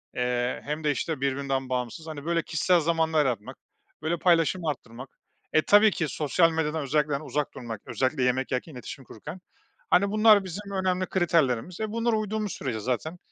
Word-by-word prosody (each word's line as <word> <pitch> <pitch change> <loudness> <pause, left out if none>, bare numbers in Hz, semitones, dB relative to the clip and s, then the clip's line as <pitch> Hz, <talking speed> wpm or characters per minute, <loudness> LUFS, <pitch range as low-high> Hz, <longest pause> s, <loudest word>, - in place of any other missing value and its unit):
eee, 125 0 -1
hem 150 +2 -4
de, 150 - +2
işte, 145 0 -3
birbirinden 135 -1 -1
bağımsız, 125 +5 -3
hani, 150 -2 -7
böyle, 170 0 +1
kişisel 165 +3 +2
zamanlar 160 -1 +1
yaratmak, 115 -5 -3 0.4
böyle, 160 +3 -1
paylaşımı 170 -1 +2
arttırmak. 125 -1 -7 0.4
E, 155 - +5
tabii 210 +4 +6
ki 170 - -1
sosyal 165 +3 +2
medyadan 160 -1 -1
özellikle, 150 +2 +1
hani, 140 +2 -2
uzak 150 -1 -2
durmak, 115 -4 -7
özellikle 130 0 0
yemek 130 +1 0
yerken 135 +4 -3
iletişim 130 +2 -9
kurarken. 150 - -9 0.5
Hani, 200 +2 +4
bunlar 215 -1 +6
bizim 200 +2 -7
önemli 185 -1 0
kriterlerimiz. 170 -4 +1
E, 215 -1 -2
bunlara 230 0 +1
uyduğumuz 215 -1 -2
sürece 120 -5 -3
zaten 130 +9 -2
155 Hz, 170 wpm, -27 LUFS, 130-180 Hz, 0.5 s, tabii